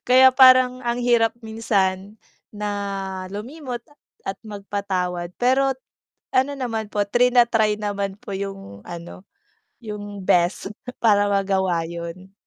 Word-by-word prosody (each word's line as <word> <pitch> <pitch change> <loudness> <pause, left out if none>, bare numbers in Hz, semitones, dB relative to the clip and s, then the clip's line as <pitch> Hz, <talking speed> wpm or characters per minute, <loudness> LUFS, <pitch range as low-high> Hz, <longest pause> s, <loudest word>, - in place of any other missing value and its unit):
Kaya 260 +1 +8
parang 255 -1 +6
ang 235 0 0
hirap 235 -2 +3
minsan 205 -2 -1 0.4
na 210 0 -4 0.7
lumimot 250 +4 -6
at 295 - -25 0.2
at 195 - -5
magpatawad. 195 -4 -3
Pero 265 +2 +3 0.6
ano 265 +2 +3
naman 225 -5 -3
po 205 -1 +1
trina-try 235 -2 +3
naman 200 -2 -2
po - - -8
yung 195 - -7
ano, 175 +2 -9 0.6
yung 205 -2 -7
best 180 +3 +2 0.3
para 205 -2 +4
magawa 190 -4 +1
'yun. 170 +3 -8
205 Hz, 115 wpm, -22 LUFS, 190-240 Hz, 0.7 s, Kaya